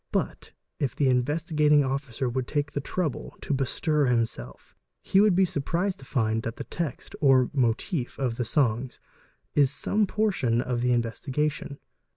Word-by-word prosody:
But - - -2 0.3
if 135 -5 -1
the 145 - +1
Investigat 150 +4 +1
ing 145 -1 +6
Officer 135 -1 -2
would 125 +1 -2
take 145 -1 -1
the 145 - -3
trouble 160 -1 -3
to - - -2
bestir 145 +2 +1
himself, 115 - -2 0.3
he 195 - +4
would 210 -3 +4
be 190 +1 +5
surprised 175 +5 -1
to 135 - -12
find 110 -4 0
that 115 0 -5
the - - -6
text, 165 -7 -5
or 130 -3 +4
'motif,' 125 +2 -1
of 125 -4 -1
the 125 - 0
songs 125 -1 0 0.5
is 145 -3 +4
some 205 +8 +1
portion 150 - +1
of 125 -1 -1
the 125 0 +2
in 120 -1 +3
vestigation. 140 +4 -3
135 Hz, 170 wpm, -27 LUFS, 125-150 Hz, 0.5 s, ing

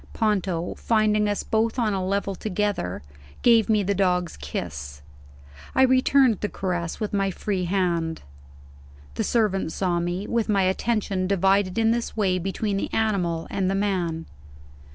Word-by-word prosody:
Ponto, 190 -6 0
finding 215 -2 +2
us 205 - -1
both 225 +2 0
on 225 -4 +1
a 190 -1 -1
level 200 +1 -1
together, 195 - -2 0.4
gave 230 -2 +5
me 210 -2 +3
the 200 +1 0
dog's 180 -3 0
kiss; 70 0 -6 0.7
I 265 - +5
returned 260 -3 +4
the 210 - -2
caress 175 -3 -3
with 215 -2 -3
my 195 -1 +1
free 190 0 -2
hand. 170 -3 -1 0.9
The - - -2
servant 205 -7 +1
saw 175 -2 0
me, 175 +3 -2
with 230 -1 -1
my 200 -2 +3
attention 195 -1 0
divided 195 0 +2
in 225 0 +3
this 235 -1 -2
way 185 -3 +1
between 195 +3 -2
the - - -3
animal 180 -7 0
and 190 -1 0
the 195 - 0
man. 180 -5 -1
195 Hz, 155 wpm, -24 LUFS, 180-215 Hz, 0.9 s, gave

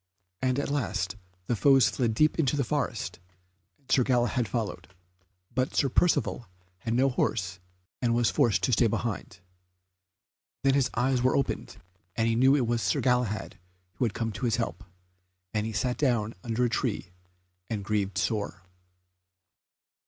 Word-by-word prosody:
And 130 0 +1
at 140 - -1
last 105 -9 -1 0.3
the 120 - 0
foes 135 0 +5
fled 115 0 0
deep 155 +6 +3
into 145 -2 +2
the 140 - +2
forest, 115 - -2 0.6
and 140 -3 -14
Sir 135 - +5
Galahad 120 -2 +1
followed; 115 -4 -3 0.7
but 130 +2 -1
Sir 140 - +3
Percivale 120 - +1 0.3
had 115 +3 -2
no 130 +2 +4
horse 95 -7 -1 0.4
and 120 -2 +2
was 120 -1 +2
forced 115 - +2
to 130 - +2
stay 115 +1 +4
behind. 105 -4 -3 1.2
Then 135 0 +4
his 135 -2 +2
eyes 125 +1 +2
were 130 +1 +3
opened, 135 - -2 0.4
and 115 0 +1
he 115 - +2
knew 130 +4 +5
it 135 -4 +2
was 115 0 0
Sir - - +1
Galahad 120 -7 0 0.4
who 125 - +1
had 110 - -2
come 115 -1 -1
to 105 +4 -4
his 115 - +2
help, 115 -3 -3 0.7
and 105 0 0
he - - -3
sat 125 +5 -1
down 120 -6 +1
under 120 +1 0
a - - +3
tree 105 -8 -2 0.6
and 105 -3 -3
grieved 100 -2 -1
sore. 100 -3 -2
120 Hz, 160 wpm, -28 LUFS, 110-130 Hz, 1.2 s, foes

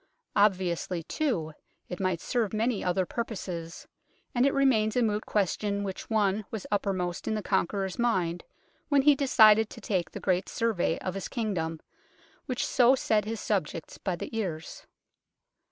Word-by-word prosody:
Obviously, 185 -4 +1
too, 175 - -1 0.3
it 180 - -6
might 185 -3 0
serve 230 -5 -1
many 220 0 0
other 180 +1 +1
purposes, 180 -7 -5 0.5
and 245 +2 +3
it - - +3
remains 230 -6 +3
a 250 - +3
moot 210 -1 -1
question 200 0 0
which 190 -2 -6
one 210 -2 +1
was 220 -3 -5
uppermost 185 -4 -1
in 220 - 0
the 210 - -3
Conqueror's 190 +2 -1
mind 180 -8 0 0.5
when 285 -2 +4
he 295 +1 +7
decided 220 -6 +5
to - - -10
take 185 -5 -1
the - - -7
great 185 0 0
Survey 220 -8 0
of 185 - -3
his 195 -1 -4
Kingdom, 175 -9 -2 0.7
which 255 -3 -1
so 250 +1 +5
set 215 -5 +1
his 225 0 -4
subjects 175 -6 -3
by 185 -3 -2
the 200 - -7
ears. 170 -8 -4
205 Hz, 155 wpm, -28 LUFS, 180-225 Hz, 0.7 s, he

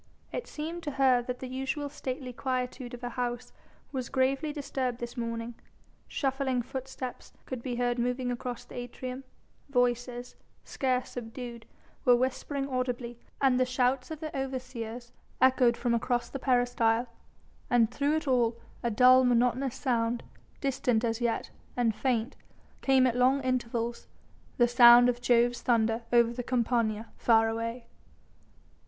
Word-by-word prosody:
It - - -4
seemed 325 +3 -5
to 295 - -4
her 260 -2 +4
that 250 +1 -5
the 260 - -4
usual 265 +3 -3
stately 260 -3 -5
quietude 250 0 -3
of 245 - -14
her 245 - -2
house 245 0 -4 0.4
was 255 -3 -4
gravely 270 +3 +1
disturbed 265 -4 -3
this 240 0 -6
morning, 230 -1 -4 0.5
shuffling 265 -3 -1
footsteps 260 0 -7
could 255 -3 -5
be 245 -1 -3
heard 245 0 0
moving 250 +1 -1
across 245 0 -5
the - - -14
atrium, 255 +2 -6 0.4
voices 245 -1 0 0.3
scarce 255 -2 -1
subdued 235 -1 -7 0.4
were 245 - +6
whispering 270 +2 -1
audibly, 250 -2 -3 0.2
and 260 -2 +4
the - - +5
shouts 255 0 +1
of 315 -1 -7
the 310 -1 -5
overseers 250 -3 -5 0.3
echoed 255 -2 +4
from 240 -1 0
across 240 +1 0
the 275 - -4
peristyle, 245 -2 +2 0.6
and 235 -2 +4
through 285 +4 +1
it 315 - -2
all 235 -3 +2 0.2
a 235 - 0
dull, 255 +3 +6
monotonous 250 +2 +2
sound, 235 -3 0 0.4
distant 250 -4 +1
as 230 0 -1
yet 235 -1 -1 0.3
and 235 -2 +2
faint, 245 +2 -1 0.5
came 265 -1 +4
at 245 -2 +1
long 255 +2 +4
intervals, 240 -2 -2 0.5
the 240 - +5
sound 240 0 +8
of 245 0 -2
Jove's 240 0 +3
thunder 225 -1 +2
over 235 -1 +4
the 245 - -3
Campania 230 -3 0
far 225 -1 +4
away. 230 +2 -3
245 Hz, 145 wpm, -29 LUFS, 235-260 Hz, 0.6 s, sound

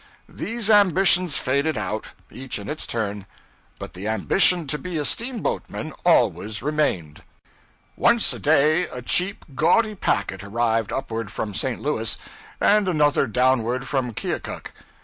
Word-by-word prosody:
These 230 -2 -3
ambitions 185 -4 +4
faded 140 +2 0
out, 105 +1 -4 0.2
each 130 -1 -5
in 100 -1 -8
its 155 - -3
turn; 105 -3 -3 0.5
but - - -9
the 95 +4 -6
ambition 170 - +3
to 150 +1 -1
be 180 -2 -5
a 150 - -1
steamboatman 230 - -1
always 110 - +1
remained. 135 - -1 0.7
Once 235 -1 +3
a - - -8
day 155 +3 +3
a 125 - -8
cheap, 185 +9 0
gaudy 215 - +2
packet 100 - -2
arrived 115 +1 -1
upward 115 -5 -4
from 105 -2 -4
St. 125 +4 -2
Louis, 115 -7 -1 0.4
and 210 -1 +3
another 150 -5 +2
downward 125 +1 +1
from 130 -3 -1
Keokuk. - - -5
135 Hz, 135 wpm, -23 LUFS, 110-175 Hz, 0.7 s, ambitions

